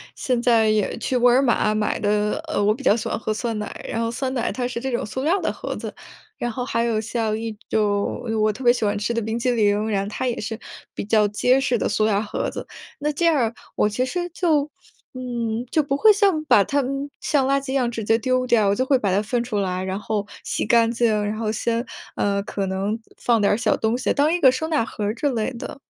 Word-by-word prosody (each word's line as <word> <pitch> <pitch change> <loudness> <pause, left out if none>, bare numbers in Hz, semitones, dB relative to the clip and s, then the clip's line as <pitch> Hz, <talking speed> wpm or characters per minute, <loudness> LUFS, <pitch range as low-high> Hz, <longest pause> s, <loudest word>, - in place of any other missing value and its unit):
现 250 -2 0
在 230 -2 +4
也 215 -2 +1
去 255 - -2
沃 245 0 +5
尔 255 +2 +5
玛 235 -4 +2
买 215 0 0
的 210 +7 0
呃， 310 - -1
我 205 +1 +3
比 275 - -10
较 205 - +5
喜 220 0 -2
欢 - - -1
喝 215 -1 -2
酸 230 0 -3
奶， 210 0 -6
然 225 - -2
后 230 0 -1
酸 260 +2 -3
奶 245 -3 -1
它 250 -1 -2
是 235 -1 -5
这 265 +1 -3
种 240 - -1
塑 260 +5 -4
料 335 +6 +3
儿 - - -5
的 - - 0
盒 - - -5
子。 - - -6 0.4
然 240 - -2
后 250 +2 -4
还 230 -3 0
有 230 -2 +1
像 220 -1 -1
一 225 -1 -5
种， 205 -1 0
哎 - - -2
哟， 220 - 0
我 215 0 +3
特 260 - -9
别 240 - +8
喜 245 - -3
欢 205 - +1
吃 210 +3 -1
的 230 - 0
冰 220 +2 -2
淇 250 - 0
淋， 210 -2 +2
然 195 -2 0
后 200 - -5
它 255 +4 -3
也 240 - -2
是 225 +1 -5 0.3
比 - - -4
较 215 0 +3
结 250 +5 +3
实 250 -2 +1
的 - - 0
塑 215 - +1
料 205 -2 +2
盒 210 - -3
子。 - - -7 0.3
那 300 +1 0
这 340 +4 0
样 330 -2 +4
儿， 235 -4 0 0.2
我 210 - +2
其 250 +5 -1
实 350 +6 -3
就， 315 -4 +1 0.5
嗯， 240 -2 -3
就 310 - +3
不 275 -1 -1
会 430 +7 +7
像， 390 -7 +2
把 210 -8 +5
它， 285 +8 0
嗯， 275 +2 -3
像 275 -3 +1
垃 275 +1 +3
圾 275 -1 -6
一 - - -2
样 255 -3 +1
直 230 -2 -4
接 225 +2 +2
丢 255 +1 +1
掉， 230 -4 +3
我 200 - +2
就 255 - 0
会 265 -1 +3
把 200 -5 0
它 190 - +3
分 235 +3 -1
出 235 -3 -3
来， 185 -2 -1
然 190 +1 -3
后 210 -1 -2 0.2
洗 - - -2
干 230 +1 +4
净， 235 0 +2 0.2
然 210 +1 -2
后 220 -2 -1
先， 230 +2 -1 0.3
呃， 200 0 0
可 200 -1 -3
能 195 +4 -2 0.2
放 235 -2 +2
点 200 - +3
儿 205 - +2
小 235 - +2
东 225 +2 0
西， 255 - 0
当 295 +2 +2
一 350 - +1
个 265 -6 +7
收 290 +5 -2
纳 305 -7 +1
盒 210 - -5
儿 210 +2 -1
之 290 - -1
类 235 -1 -1
的。 240 +3 -7
230 Hz, 290 characters per minute, -23 LUFS, 215-260 Hz, 0.5 s, 别